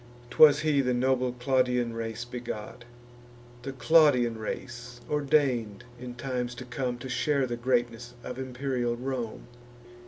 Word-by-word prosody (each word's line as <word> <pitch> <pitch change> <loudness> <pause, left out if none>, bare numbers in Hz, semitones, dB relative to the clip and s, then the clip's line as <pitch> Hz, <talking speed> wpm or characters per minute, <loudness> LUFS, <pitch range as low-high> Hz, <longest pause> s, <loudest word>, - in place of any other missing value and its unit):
'Twas 150 +3 +7
he, 150 -3 +2
the 125 -2 0
noble 130 0 +1
Claudian 125 -1 +1
race 115 +1 -4
begot, 120 -1 -7 0.8
The 135 - -5
Claudian 130 -4 +4
race, 120 +2 -6
ordain'd, 135 -8 +1 0.2
in 125 -1 -7
times 125 -1 -3
to 130 - -8
come, 125 0 -3
To 120 - -8
share 140 +2 +1
the 120 -1 -3
greatness 120 -1 -1
of 125 +1 -6
imperial 125 -2 -2
Rome. 125 -2 -4
125 Hz, 130 wpm, -28 LUFS, 120-130 Hz, 0.8 s, Twas